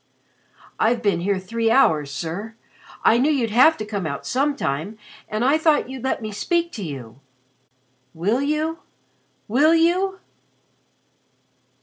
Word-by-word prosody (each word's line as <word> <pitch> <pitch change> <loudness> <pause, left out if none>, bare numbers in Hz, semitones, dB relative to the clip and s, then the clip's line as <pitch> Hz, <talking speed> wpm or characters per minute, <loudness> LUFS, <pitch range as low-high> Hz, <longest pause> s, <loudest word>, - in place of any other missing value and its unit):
"I've 235 +1 +1
been 200 -5 +1
here 195 +3 0
three 225 +5 -1
hours, 155 - +3
sir. 175 +10 -5 0.5
I 230 - +5
knew 275 +4 +3
you'd 245 -7 0
have 260 +8 +5
to 215 - -5
come 200 -5 -3
out 140 -1 -5
sometime 225 - -1 0.3
and 215 +3 -1
I 290 +4 +3
thought 310 -5 +2
you'd 265 -2 -8
let 265 -3 -2
me 215 - -4
speak 340 - -1
to 215 - -6
you. 135 -7 -8 1.0
Will 205 +10 0
you 305 +3 -1 0.7
will 290 +9 +4
you?" 365 +4 +2
230 Hz, 135 wpm, -22 LUFS, 190-295 Hz, 1.0 s, I